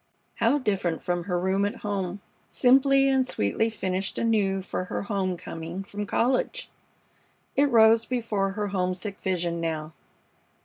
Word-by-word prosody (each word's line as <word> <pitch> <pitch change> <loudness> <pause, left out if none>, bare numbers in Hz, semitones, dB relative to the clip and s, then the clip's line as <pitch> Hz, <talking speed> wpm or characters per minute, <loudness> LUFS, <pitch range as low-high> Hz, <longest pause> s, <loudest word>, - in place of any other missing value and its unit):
How 235 +5 +3
different 195 - -1
from 175 -1 -1
her 180 -2 -1
room 190 +2 +1
at 205 - -2
home, 195 -1 -2 0.3
simply 270 +2 +4
and 265 -1 +3
sweetly 225 - 0
finished 190 -3 -2
anew 200 -4 +1
for 185 - -3
her - - -4
home 195 -3 -1
coming 165 +3 -6
from 205 +1 -6
college! 260 - 0 0.8
It 285 +1 +4
rose 225 -1 +5
before 215 -6 -1
her 205 0 -2
homesick 190 +1 -2
vision 175 -3 -1
now. 160 -1 -3
200 Hz, 140 wpm, -26 LUFS, 180-230 Hz, 0.8 s, rose